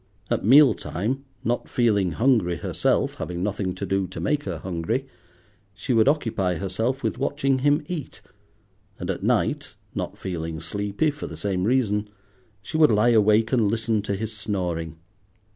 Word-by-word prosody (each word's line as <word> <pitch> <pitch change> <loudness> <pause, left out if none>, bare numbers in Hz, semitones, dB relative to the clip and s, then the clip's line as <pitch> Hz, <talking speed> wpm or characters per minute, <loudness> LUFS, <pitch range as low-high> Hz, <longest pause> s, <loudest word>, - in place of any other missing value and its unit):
At - - +1
meal 135 +5 +7
time, 125 - -3 0.2
not 120 +1 -1
feeling 100 -8 +2
hungry 110 -6 +2
herself, - - 0
having 90 0 -4
nothing 100 -2 -2
to 100 - -4
do 95 0 0
to 80 - -8
make 145 - 0
her 90 -4 -3
hungry, 95 - -2 0.7
she 115 +5 -2
would 115 +1 +4
occupy 115 - +1
herself 110 +9 -2
with 115 +2 -1
watching 135 -1 +1
him 145 +2 +2
eat; 155 -4 -6 0.8
and - - -2
at - - -5
night, - - 0 0.2
not - - -4
feeling 80 -3 -4
sleepy 105 - -1
for 145 - -7
the 80 - -8
same 95 +1 -1
reason, 105 -4 +1 0.5
she 155 - -3
would 155 -1 +6
lie 110 +2 +4
awake 110 0 +4
and 115 -5 +3
listen 110 -1 0
to 100 -1 -2
his 110 +2 -4
snoring. 90 -6 -3
105 Hz, 160 wpm, -24 LUFS, 95-125 Hz, 0.8 s, meal